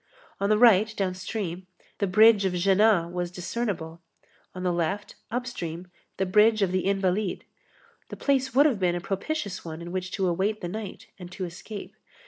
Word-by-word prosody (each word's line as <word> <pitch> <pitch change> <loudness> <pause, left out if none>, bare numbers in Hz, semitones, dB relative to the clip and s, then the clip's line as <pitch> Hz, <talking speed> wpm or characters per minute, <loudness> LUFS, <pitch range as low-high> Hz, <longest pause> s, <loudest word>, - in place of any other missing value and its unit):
On 200 - 0
the 215 - +4
right, 220 -2 +6
downstream, 185 -1 -3 0.3
the 200 - +1
bridge 215 +2 +6
of 190 -2 0
Jéna 190 -1 +3
was 175 0 -2
discernible, 175 -3 -4 0.5
on 185 - -5
the 180 -1 +1
left, 175 +4 -2 0.2
upstream, 185 -8 -5 0.3
the 190 - +1
bridge 210 +3 +4
of 185 - +1
the 185 0 0
Invalides; 195 0 0 0.7
the - - -7
place 265 -2 0
would 285 +2 +6
have 260 -9 +2
been 180 -2 +1
a - - -1
propitious 200 - -3
one 160 -1 -7
in 170 0 -7
which 185 0 -3
to 190 -3 0
await 195 +5 0
the 175 - -3
night 205 +1 -6
and 180 -1 -9
to 185 - -4
escape. 195 +4 -9
190 Hz, 175 wpm, -26 LUFS, 180-215 Hz, 0.7 s, right